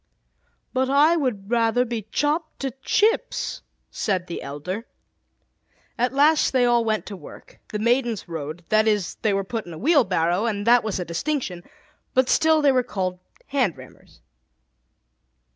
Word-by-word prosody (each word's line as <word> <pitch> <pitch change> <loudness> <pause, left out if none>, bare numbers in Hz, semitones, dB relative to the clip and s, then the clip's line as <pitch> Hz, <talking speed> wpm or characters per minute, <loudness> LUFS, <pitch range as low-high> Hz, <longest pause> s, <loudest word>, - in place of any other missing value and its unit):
"But 260 0 +1
I 295 +5 +5
would 235 -9 -2
rather 235 +1 +2
be 225 -3 -5
chopped 310 +2 -1
to 270 -1 -2
chips," 450 - 0 0.3
said 185 -4 -1
the 170 - -6
elder. 180 - -6 1.1
At 245 +2 0
last 295 +3 +3
they 255 -2 +4
all 240 -1 +3
went 215 -1 -1
to 205 - -7
work. 185 - -14
The 210 - -4
Maidens 235 -1 0
rode 160 0 -6
that 215 0 +3
is, 210 -5 0
they 215 - +2
were 195 0 0
put 220 0 -5
in 170 - -8
a - - -8
wheelbarrow, 195 - +2
and 205 -2 -2
that 240 +1 +5
was 215 -3 -2
a 180 - -3
distinction; 180 - -3 0.5
but 260 0 +3
still 315 -1 +3
they 280 - +6
were 255 -1 +3
called 185 -6 -3 0.3
"hand 260 - 0
rammers." - - -16
230 Hz, 160 wpm, -23 LUFS, 190-270 Hz, 1.1 s, they